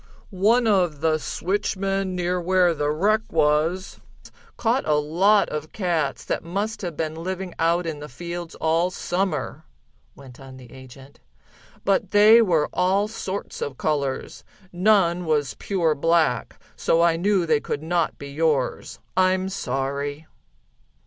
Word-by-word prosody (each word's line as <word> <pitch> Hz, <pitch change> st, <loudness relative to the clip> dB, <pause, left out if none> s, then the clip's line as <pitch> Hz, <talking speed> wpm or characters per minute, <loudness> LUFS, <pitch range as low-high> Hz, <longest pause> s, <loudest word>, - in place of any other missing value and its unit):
"One 215 Hz, +6 st, +3 dB
of 180 Hz, -8 st, +1 dB
the 160 Hz, -1 st, +2 dB
switchmen 195 Hz, +2 st, -2 dB
near 180 Hz, 0 st, -1 dB
where 180 Hz, 0 st, +3 dB
the 145 Hz, -2 st, -1 dB
wreck 205 Hz, +8 st, +2 dB
was, 160 Hz, +4 st, +1 dB, 0.6 s
caught 240 Hz, +3 st, +1 dB
a 150 Hz, -, +3 dB
lot 180 Hz, +8 st, +3 dB
of 150 Hz, +1 st, -5 dB
cats, 170 Hz, -8 st, -1 dB
that -, -, -2 dB
must 200 Hz, +6 st, -3 dB
have 175 Hz, -5 st, -5 dB
been 155 Hz, -1 st, -2 dB
living 185 Hz, +2 st, -5 dB
out 170 Hz, +2 st, +2 dB
in 160 Hz, -3 st, -4 dB
the 150 Hz, +1 st, -8 dB
fields 170 Hz, +4 st, -7 dB
all 165 Hz, +3 st, +1 dB
Summer," 185 Hz, +1 st, -3 dB, 0.5 s
went 130 Hz, -3 st, -14 dB
on 135 Hz, -1 st, -12 dB
the 125 Hz, -2 st, -14 dB
agent, 130 Hz, +1 st, -14 dB, 0.7 s
"but 195 Hz, 0 st, +1 dB
they 215 Hz, +3 st, +7 dB
were 165 Hz, -8 st, +2 dB
all 190 Hz, +3 st, +2 dB
sorts 200 Hz, -2 st, -6 dB
of 135 Hz, -3 st, -4 dB
colors. 140 Hz, -3 st, -2 dB, 0.3 s
None 180 Hz, -2 st, +3 dB
was 150 Hz, -4 st, 0 dB
pure 175 Hz, -6 st, +1 dB
black, 155 Hz, -6 st, +1 dB, 0.2 s
so 165 Hz, +1 st, +2 dB
I 170 Hz, -1 st, +4 dB
knew 190 Hz, +1 st, +1 dB
they 155 Hz, -2 st, +2 dB
could 145 Hz, +1 st, -4 dB
not 170 Hz, 0 st, 0 dB
be 140 Hz, 0 st, -9 dB
yours. 150 Hz, -3 st, -1 dB, 0.2 s
I'm 185 Hz, 0 st, +2 dB
sorry." 140 Hz, -1 st, -3 dB
170 Hz, 140 wpm, -23 LUFS, 150-190 Hz, 0.7 s, they